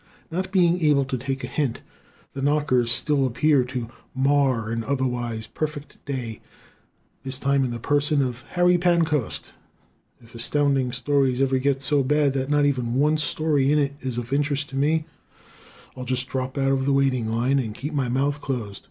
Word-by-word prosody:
Not 185 +3 -3
being 180 -2 +3
able 145 -3 +4
to 130 - -3
take 135 +1 -4
a - - -3
hint, 135 -2 -2 0.5
the 135 - -5
knockers 140 -4 +2
still 140 +1 +2
appear 140 +2 +3
to 125 -2 -5 0.3
mar 130 -4 +2
an 115 0 -2
otherwise 120 -4 -2
perfect 150 +1 -6
day 125 -6 -5 0.8
this 130 0 -3
time 140 0 +1
in 130 - -1
the 120 - -4
person 145 +4 +1
of 125 -1 -4
Harry 180 0 +4
Pancoast. 165 -7 +1 0.7
If 115 -1 -19
Astounding 135 +1 +1
Stories 130 0 +1
ever 135 -1 +2
gets 135 0 0
so 145 0 +3
bad 145 +1 +2
that 135 0 -2
not 145 0 +3
even 125 -4 0
one 150 +3 +3
story 145 -2 +1
in 150 - +3
it 140 -1 +1
is 130 -2 -4
of 120 +2 -4
interest 145 0 0
to 135 - -8
me 155 +3 +1 0.9
I'll 130 - -6
just 130 0 -2
drop 130 +1 -4
out 135 0 +2
of 135 -1 +1
the 140 - +2
waiting 130 -4 +1
line 125 +5 +1
and 110 -5 -3
keep 150 +5 -5
my 135 -4 0
mouth 140 +3 0
closed. 115 -7 -4
135 Hz, 180 wpm, -24 LUFS, 125-145 Hz, 0.9 s, able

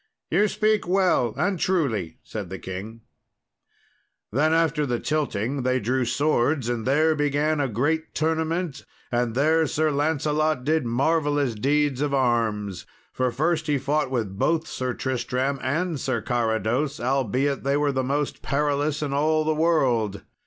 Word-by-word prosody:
"You 200 +6 +4
speak 215 -1 +1
well 180 - +2
and 180 +4 0
truly," 120 - 0
said 105 -5 -6
the 95 - -5
king. 105 +6 -7 1.3
Then 150 +7 +2
after 160 -2 +2
the 120 -2 -1
tilting, 140 -4 -1
they 130 +1 +1
drew 125 +3 0
swords, 140 0 +1
and 120 -1 -2
there 155 +4 +3
began 145 +1 +1
a 135 - +1
great 150 +8 -1
tournament, 160 -1 -1 0.3
and 120 -1 0
there 160 +4 +3
Sir 155 0 +1
Lancelot 150 -1 0
did 155 -2 +1
marvellous 145 +1 +1
deeds 140 +4 +1
of 145 -1 0
arms, 110 -7 0 0.3
for 130 0 0
first 155 +6 0
he 145 -1 +2
fought 145 +1 0
with 110 -7 -3
both 165 0 +1
Sir 130 -1 -3
Tristram 130 +1 -1
and 160 +4 -1
Sir 120 - -1
Carados, 120 +5 -1
albeit 135 +2 0
they 140 +1 +1
were 145 -1 +1
the 130 -1 -1
most 140 +2 -2
perilous 145 +1 0
in 140 -2 -2
all 155 +2 +2
the 155 - +2
world. 130 -11 +1
140 Hz, 150 wpm, -24 LUFS, 120-155 Hz, 1.3 s, You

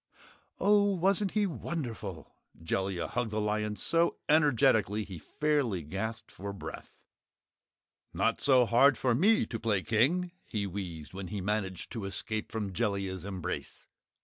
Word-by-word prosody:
"Oh, 205 -1 +4
wasn't 195 +2 +1
he 210 - +4
WONDERFUL?" 120 - -5 0.3
Jellia 95 +1 -1
hugged 120 -2 -2
the 110 0 -2
lion 105 0 -1
so 165 - +1
energetically 115 - +4
he 95 -4 -8
fairly 140 - 0
gasped 110 +9 -5
for 100 +1 -6
breath. 100 - -8 1.2
"Not - - 0
so 130 -3 +5
hard 120 +4 +5
for 125 -2 +2
ME 205 - +4
to 115 - -5
play 105 -4 0
King," 165 +11 +2 0.2
he 105 -3 -2
wheezed 90 -6 -6
when 95 0 -6
he 100 +2 -4
managed 95 -2 -2
to 110 -4 -4
escape 110 +3 -3
from 105 -3 -3
Jellia's 100 -4 -1
embrace. 95 -4 -5
110 Hz, 140 wpm, -30 LUFS, 95-140 Hz, 1.2 s, so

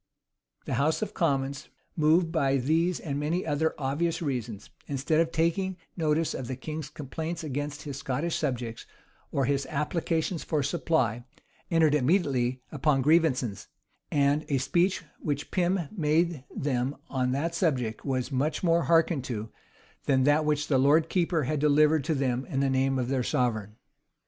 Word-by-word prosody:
The - - -3
house 155 +8 +1
of - - -5
commons, 140 -4 -1 0.3
moved 165 +2 +3
by 140 -5 +2
these 160 +7 +1
and 145 -3 -3
many 160 +5 -1
other 160 +1 0
obvious 150 +4 -1
reasons, 120 - -4 0.2
instead 145 +3 0
of 165 0 +2
taking 175 +3 0 0.2
notice 160 -1 +1
of 125 - -5
the 130 - -3
king's 155 +2 -6
complaints 160 +4 -5
against 145 0 -4
his 140 -3 -6
Scottish 140 +5 -2
subjects, 125 -6 -3 0.4
or 135 - +1
his 140 +1 0
applications 160 +2 -1
for 150 -3 0
supply, 135 -6 0 0.5
entered 160 -3 +4
immediately 130 -5 +1
upon 145 -2 +1
grievances; 135 - +2 0.4
and 145 +1 +2
a 140 - +2
speech 170 +9 +1 0.2
which 145 -1 -3
Pym 180 0 +1
made 160 -4 0
them 135 0 -1
on 130 -2 0
that 160 +5 -1
subject 130 - 0
was 130 -1 -2
much 145 +6 -1
more 170 -1 +3
hearkened 165 -4 +3
to, 110 -3 -4 0.6
than 130 -2 +3
that 145 +2 +3
which 150 0 +1
the 135 -3 +3
lord 155 +4 +4
keeper 170 -3 +1
had 150 +3 -1
delivered 150 +1 +4
to 160 -1 +1
them 130 -2 0
in 135 -6 -2
the 135 -1 +2
name 135 0 +2
of 125 -2 -1
their 130 0 0
sovereign. 110 -4 -1
145 Hz, 160 wpm, -28 LUFS, 130-160 Hz, 0.6 s, entered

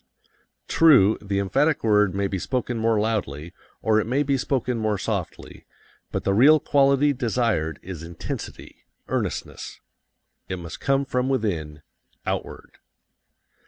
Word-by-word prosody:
True, 135 -11 +5
the 100 -1 -3
emphatic 100 - +1
word 105 -4 +3
may 100 0 0
be 95 -1 -2
spoken 125 +2 -2
more 110 -1 +2
loudly, 90 -8 -2 0.3
or 110 -1 +3
it 110 - -2
may 135 +5 +1
be 140 -1 +1
spoken 125 -2 -1
more 110 -2 0
softly, - - -5 0.4
but - - -3
the 100 - +1
real 145 +9 +6
quality 140 0 +3
desired 115 - -1
is 90 -4 -7
intensity, 85 0 -8 0.2
earnestness. - - -4 0.7
It 95 - -3
must 85 -2 -8
come 135 0 +1
from 130 -1 -1
within, 80 - -2 0.4
outward. - - -5
110 Hz, 130 wpm, -24 LUFS, 95-135 Hz, 0.7 s, real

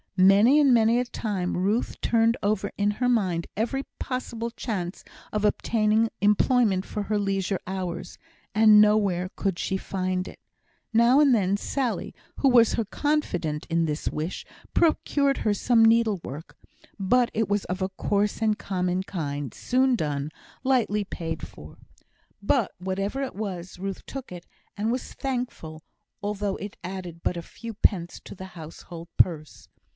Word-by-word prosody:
Many 200 +9 +6
and 285 -3 +5
many 230 0 +4
a 250 - 0
time 200 -7 -3
Ruth 205 +6 0
turned 230 +1 +2
over 205 0 0
in 205 0 +2
her 250 +4 0
mind 185 -8 +1
every 240 +6 -1 0.2
possible 235 -3 -3
chance 195 -7 -4 0.3
of 210 0 0
obtaining 220 +1 +2
employment 210 -1 +3
for 210 - -4
her 210 +1 -1
leisure 195 -2 -1
hours, 185 -2 -5 0.4
and 215 -1 +7
nowhere 200 -4 +2
could 195 -3 -1
she 190 - -1
find 185 -1 -2
it. - - -11 0.5
Now 235 +4 +5
and 285 -3 +5
then 200 -3 +2
Sally, 255 +2 -2 0.2
who 275 - +3
was 235 -3 +5
her 230 - 0
confidante 185 - -1
in 165 0 +2
this 150 -1 -2
wish, 155 +4 -4 0.3
procured 285 -4 +2
her 215 - +1
some 225 +2 +4
needlework, 210 - +1 0.4
but 240 +5 +3
it 225 0 0
was 205 0 0
of 185 +1 -4
a 190 - 0
coarse 205 +2 -1
and 215 -1 +2
common 180 -1 -1
kind, 145 - -4
soon 260 0 +2
done, 145 -6 -2 0.3
lightly 235 -6 +2
paid 165 -5 -5
for. 75 - -13 0.7
But - - +2
whatever 195 +8 -2
it 265 - -5
was, 185 -4 -5
Ruth 195 0 -5
took 270 -5 -7
it, 175 -1 -9 0.3
and 215 +3 0
was 250 +1 -4
thankful, 245 -12 -4 0.4
although 205 -1 -2
it 205 0 -8
added 180 -2 -6
but 180 - 0
a - - -3
few 230 +6 -9
pence 175 -5 +1
to - - -9
the 190 - -8
household 165 +1 -10
purse. 155 -4 0
205 Hz, 155 wpm, -26 LUFS, 180-230 Hz, 0.7 s, and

